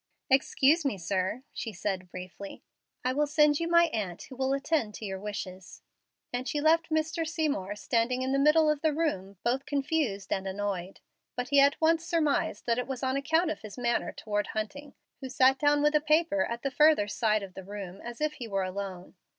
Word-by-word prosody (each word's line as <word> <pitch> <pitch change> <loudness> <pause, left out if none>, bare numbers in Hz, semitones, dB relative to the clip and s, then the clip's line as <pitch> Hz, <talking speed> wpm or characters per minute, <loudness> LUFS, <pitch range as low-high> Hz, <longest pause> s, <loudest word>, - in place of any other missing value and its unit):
"Excuse 275 +4 +4
me, 270 -8 -1
sir," 190 +6 -2
she 225 - -4
said, 185 -1 -3
briefly. 185 +2 -9 0.4
"I 255 - +2
will 295 +2 +1
send 300 0 +4
you 335 - -1
my 340 0 +6
aunt, 195 -6 -3
who 260 - -11
will 265 +1 0
attend 275 -5 0
to 220 - -7
your 190 -1 -4
wishes;" 190 -3 -7 0.5
and 250 +1 -2
she 295 - -1
left 325 +2 +3
Mr. 315 +1 0
Seymour 300 - -2
standing 240 +4 0
in 260 - -1
the 275 - +2
middle 305 +2 +5
of 300 -1 +1
the 315 -2 +1
room, 200 - -2
both 255 +3 0
confused 275 -9 -1
and 195 0 -3
annoyed; 190 -1 -4 0.3
but 245 0 -3
he 285 - +5
at 280 +1 +4
once 330 +1 +3
surmised 310 -10 0
that 235 0 +1
it 250 - -3
was 265 -1 -5
on 260 0 0
account 320 +4 +1
of - - -6
his 215 0 -10
manner 240 -1 0
toward 210 -1 -2
Hunting, 280 +7 -5 0.2
who 265 - -6
sat 260 +1 +4
down 290 0 +3
with 295 +1 +3
a 300 - +4
paper 305 -1 +2
at 235 0 -5
the 275 - -1
further 300 -7 +4
side 215 -1 +1
of 190 -2 -9
the 190 - -8
room, 195 -1 -8
as 240 0 -7
if 305 0 0
he 245 -6 -7
were 195 -2 -1
alone. 185 -1 -6
260 Hz, 205 wpm, -29 LUFS, 205-300 Hz, 0.5 s, my